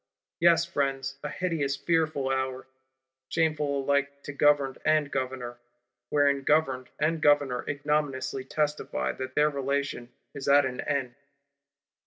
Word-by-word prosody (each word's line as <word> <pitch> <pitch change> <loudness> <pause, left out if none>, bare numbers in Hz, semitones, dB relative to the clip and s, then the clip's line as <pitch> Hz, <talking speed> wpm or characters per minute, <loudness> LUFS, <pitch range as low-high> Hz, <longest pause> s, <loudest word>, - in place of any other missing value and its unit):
Yes, 170 -1 +5
Friends: 135 -4 -2
a - - -4
hideous 160 -6 -1
fearful 155 -5 0
hour; 130 -1 -2 0.6
shameful 150 -4 0
alike 140 0 0
to 145 - -6
Governed 140 -2 +2
and 155 -2 +2
Governor; 125 -2 -4 0.5
wherein 140 -1 +3
Governed 135 -3 +1
and 155 +2 0
Governor 145 -5 +3
ignominiously 145 -2 -1
testify 145 - -1
that 130 - -7
their 150 0 +4
relation 140 -3 -2 0.2
is 140 -2 -7
at 140 0 +6
an 125 -1 -3
end. 135 -4 -2
140 Hz, 125 wpm, -28 LUFS, 130-150 Hz, 0.6 s, at